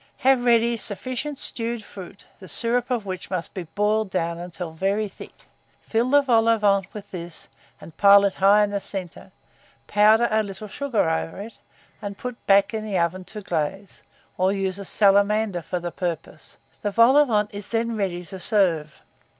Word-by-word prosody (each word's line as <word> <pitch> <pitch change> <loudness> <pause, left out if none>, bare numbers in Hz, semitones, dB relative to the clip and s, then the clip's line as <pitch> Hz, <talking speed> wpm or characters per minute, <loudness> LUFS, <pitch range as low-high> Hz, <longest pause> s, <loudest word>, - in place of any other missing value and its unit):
Have 265 -2 +4
ready 235 0 +3
sufficient 255 +7 -3
stewed 230 -2 -3
fruit, 195 0 -12
the 185 - -12
syrup 240 - -1
of 240 -5 -1
which 185 -1 -6
must 180 -3 -4
be 180 -4 -6
boiled 210 0 +1
down 170 -2 -2
until 175 -1 -6
very 195 +6 -1
thick; 195 - -14 0.4
fill 235 +2 0
the 285 +1 +5
vol 230 -4 +3
au 230 - +4
vent 200 -2 +1
with 205 -1 -10
this, 175 -2 -8 0.3
and 165 - -13
pile 200 0 +7
it 195 - +1
high 200 +2 +4
in 205 - -1
the 200 - -1
centre; 190 -3 -8 0.5
powder 215 +3 +4
a 220 0 +3
little 210 +1 -7
sugar 235 -2 -1
over 160 +2 -2
it, 220 +2 -10 0.4
and 200 -1 -6
put 250 0 -5
it 235 - -31
back 195 +1 +4
in 220 -1 -3
the 205 -3 -2
oven 175 +2 -1
to 210 +2 -8
glaze, 190 +3 -4 0.4
or 185 +1 +3
use 195 -1 -2
a 200 - -7
salamander 200 -1 +2
for 180 +3 -4
the 175 0 -5
purpose: 170 -3 -6 0.2
the 205 - -1
vol 230 +6 +5
au 295 0 +6
vent 210 -4 0
is 205 0 -8
then 230 0 -1
ready 180 -4 -3
to 190 +1 -9
serve. 175 -8 0
200 Hz, 190 wpm, -23 LUFS, 185-225 Hz, 0.5 s, pile